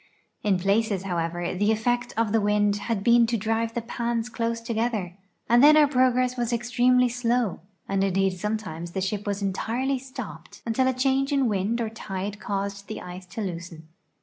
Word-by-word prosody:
In 200 -3 +2
places, 200 +1 +1
however, 175 -1 -2
the 205 +4 +2
effect 240 +2 0
of 225 -2 +1
the 225 0 +3
wind 205 0 +2
had 205 0 -2
been 235 0 +5
to 235 0 0
drive 225 +2 -1
the 235 - -2
pans 235 0 -2
close 230 -1 -2
together, 225 -5 -2 0.3
and 240 +2 +5
then 305 +1 +8
our 305 - +7
progress 255 -2 +2
was 240 -1 -1
extremely 245 +1 +3
slow, 240 -3 0 0.3
and 195 0 +1
indeed 195 0 +2
sometimes 180 -4 -4
the - - -1
ship 205 +2 -2
was 200 0 -2
entirely 240 +7 -1
stopped 245 - -9
until 235 +3 +1
a 260 - +2
change 270 +2 +1
in 275 -3 +2
wind 210 +2 0
or 225 -2 -1
tide 205 -2 -5
caused 200 0 -4
the 215 - -5
ice 180 +1 -9
to 195 +5 -6
loosen. 170 -4 -6
220 Hz, 180 wpm, -25 LUFS, 195-240 Hz, 0.3 s, then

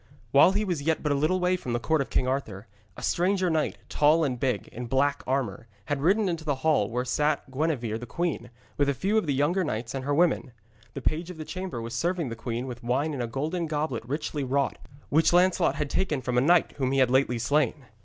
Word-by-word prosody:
While 140 +8 +6
he 210 +2 0
was 175 -6 -2
yet 160 +2 0
but 150 - 0
a 140 0 +1
little 185 +5 +2
way 180 0 +2
from 125 -9 -4
the 120 - 0
court 160 +4 +1
of 135 - -4
King 130 - 0
Arthur, 110 -7 -3 0.3
a - - -8
stranger 185 0 +1
knight, 155 -1 0
tall 155 +2 +3
and 130 -5 -1
big, 130 -1 -1
in 120 +1 -7
black 140 +3 +1
armour, 125 -4 -2 0.2
had 145 -1 -2
ridden 195 +6 +3
into 165 -3 -2
the 145 -3 0
hall 145 -10 +3
where 125 +2 -2
sat 150 +1 0
Gwenevere 130 -6 -1
the 120 - -8
queen, 160 -5 -2 0.3
with 145 -1 +3
a 140 - 0
few 195 - 0
of 175 - -5
the 145 - +1
younger 165 +7 +2
knights 115 -6 -3
and 135 -1 -4
her 145 +1 0
women. 160 -6 +2 0.4
The - - -6
page 165 +3 -1
of 180 - -8
the 155 - -6
chamber 185 -8 -5
was 115 +1 -6
serving 170 +3 -1
the 115 - -5
queen 115 +2 -4
with 120 -2 -7
wine 135 +6 0
in 135 - -3
a 120 - -2
golden 155 +8 -2
goblet 150 -6 -2
richly 145 +3 -3
wrought, 135 +1 0 0.3
which 160 +3 +3
Lancelot 180 +1 +3
had 145 -1 -3
taken 155 -7 0
from 125 0 -2
a 125 - +4
knight 170 +5 +4
whom 130 -2 0
he - - +1
had 130 -2 +4
lately 130 -2 +2
slain. 140 +2 0
145 Hz, 240 wpm, -27 LUFS, 125-165 Hz, 0.4 s, While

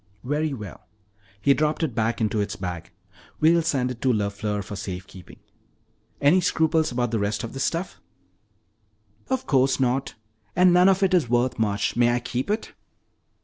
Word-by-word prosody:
"Very 150 +4 -1
well." 105 -7 -8 0.5
He 140 +7 +4
dropped 155 +3 0
it 150 -7 -1
back 115 +1 -1
into 110 -1 0
its 100 0 -3
bag. 90 -2 -6 0.5
"We'll 165 +2 +4
send 135 -6 0
it 120 - -9
to 130 - +2
LeFleur 105 -1 -2
for 105 +1 -7
safe 95 -2 -6
keeping. 95 -2 -14 0.8
Any 160 +6 +4
scruples 160 -3 +1
about 120 -1 -1
the 115 - 0
rest 100 +3 -1
of 115 - -6
this 135 +1 -1
stuff?" 170 +2 -3 1.3
"Of 260 0 -1
course 135 -1 +2
not! 130 +1 0 0.4
And 180 0 +5
none 180 +2 +6
of 195 +1 +2
it 190 -1 +2
is 165 -10 +2
worth 120 0 +1
much. 100 -2 0
May 120 0 +3
I - - 0
keep 125 +4 -4
it?" 215 +2 -2
125 Hz, 175 wpm, -24 LUFS, 105-155 Hz, 1.3 s, none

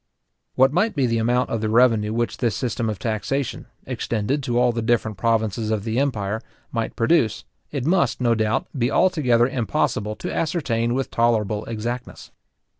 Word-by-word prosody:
What 135 +2 +4
might 200 +7 +1
be 140 -3 +2
the 115 -1 +1
amount 120 +3 +1
of 115 - -1
the 110 - -1
revenue 115 -2 +4
which 120 +1 -1
this 120 -3 0
system 120 -2 -2
of 105 - -3
taxation, 115 +6 -2 0.2
extended 120 +1 -2
to 120 -2 -1
all 125 0 +4
the 115 0 -3
different 110 -1 0
provinces 110 -1 0
of 110 -2 -1
the 115 +2 -1
empire, 110 -6 -1 0.3
might 115 -2 -2
produce, 115 -3 +2 0.3
it 140 -4 -3
must, 175 +3 +2
no 120 -2 +3
doubt, 110 -1 0
be 125 -2 +1
altogether 130 -10 +3
impossible 115 -4 -1
to - - -5
ascertain 125 -8 0
with 135 0 -2
tolerable 110 -3 +1
exactness. 120 +3 -5
115 Hz, 170 wpm, -23 LUFS, 110-130 Hz, 0.3 s, What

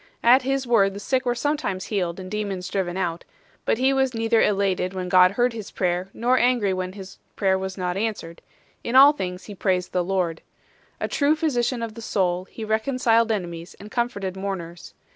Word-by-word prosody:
At 250 +3 +6
his 270 +1 -1
word 200 -5 +3
the - - -6
sick 255 +4 -1
were 240 - +1
sometimes 290 -8 -2
healed 180 -4 -2
and 185 0 -8
demons 200 -4 -3
driven 185 -2 -2
out; 175 -3 -2 0.4
but - - +2
he 260 +2 +3
was 265 -2 +1
neither 225 0 +2
elated 195 -2 +1
when 180 -1 -3
God 185 +1 +6
heard 245 +2 +1
his 220 -3 -7
prayer, 180 0 -1
nor 250 +2 +1
angry 240 -6 +2
when 185 0 -3
his 190 -1 -11 0.2
prayer 190 -2 +2
was 190 0 -4
not 180 -1 -2
answered; 200 -5 -4 0.4
in 235 - -3
all 280 +3 +9
things 180 -9 -5
he 210 - -8
praised 185 -2 -1
the 180 - 0
Lord. 180 -3 -1 0.6
A - - -1
true 290 +1 +2
physician 250 -6 0
of 225 -2 -5
the 230 - -9
soul, 185 -4 0
he 220 +3 -8
reconciled 230 0 +2
enemies 170 -5 -4
and 210 +1 -11
comforted 200 -6 -2
mourners. 185 -3 -6
200 Hz, 195 wpm, -24 LUFS, 185-240 Hz, 0.6 s, all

